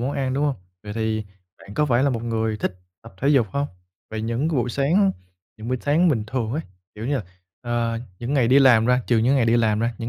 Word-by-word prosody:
món 130 +4 -1
ăn, 130 -1 -1
đúng 145 - +1
hông? 145 -2 +1 0.3
Vậy 105 - -7
thì 110 -1 -1 0.3
bạn 100 +1 -12
có 150 - +2
phải 125 -1 +2
là 140 - +3
một 115 -3 -3
người 110 -2 -1
thích 95 - -3 0.3
tập - - -14
thể 140 - +1
dục 135 -7 +4
hông? 140 +5 -1 0.4
Vậy 110 0 -4
những 115 +7 -1
cái 160 - -1
buổi 125 0 0
sáng, 180 - +2 0.4
những 110 +2 -8
buổi 130 - 0
sáng 160 +5 +3
bình 115 -9 +1
thường 115 -1 -2
ấy, 155 - -1 0.3
kiểu 110 +3 -6
như, 145 - +1
là, 125 - -3 0.4
ờ, 120 -1 -1 0.2
những 125 +5 -3
ngày 125 -4 +3
đi 135 +3 +6
làm 120 -5 +6
ra 125 0 +3
trừ 120 -2 +3
những 125 +5 +3
ngày 120 -4 +2
đi 115 +1 +4
làm 110 -2 +2
ra, 115 0 0
những 115 - -4
120 Hz, 260 wpm, -23 LUFS, 115-140 Hz, 0.4 s, đi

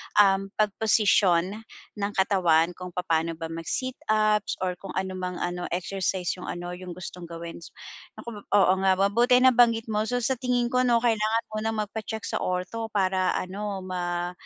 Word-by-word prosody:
um, 195 -1 +5
pagposisyon 205 -3 +2 0.4
ng 200 +1 -1
katawan 180 -4 +3
kung 180 0 -9
papaano 165 -2 0
ba 165 0 -6
mag-sit 205 +11 -4
ups 215 -1 +2
or 180 -1 -2
kung 195 - -8
ano 190 0 -1
mang 180 -1 -4
ano, 175 0 -3
exercise 185 -1 -2
yung - - -8
ano 175 0 -5
yung 180 -1 -8
gustong 180 -1 -8
gawin, 170 0 -8
s - - -11 0.5
naku, 230 -3 -8
oo 195 -2 +3
nga, 190 - +5
mabuti 220 +6 +3
nabanggit 235 -3 +4
mo. 215 +1 0
So, 245 -1 -1
sa 260 0 0
tingin 245 -1 0
ko 250 0 +2
'no, 235 0 +3
kailangan 225 0 +2
munang 215 0 -1
magpa-check 220 +1 -6
sa - - -2
ortho 185 +5 -2
para 185 -1 +2
ano, 195 +1 -4
ma 175 -1 -3
195 Hz, 165 wpm, -26 LUFS, 180-220 Hz, 0.5 s, um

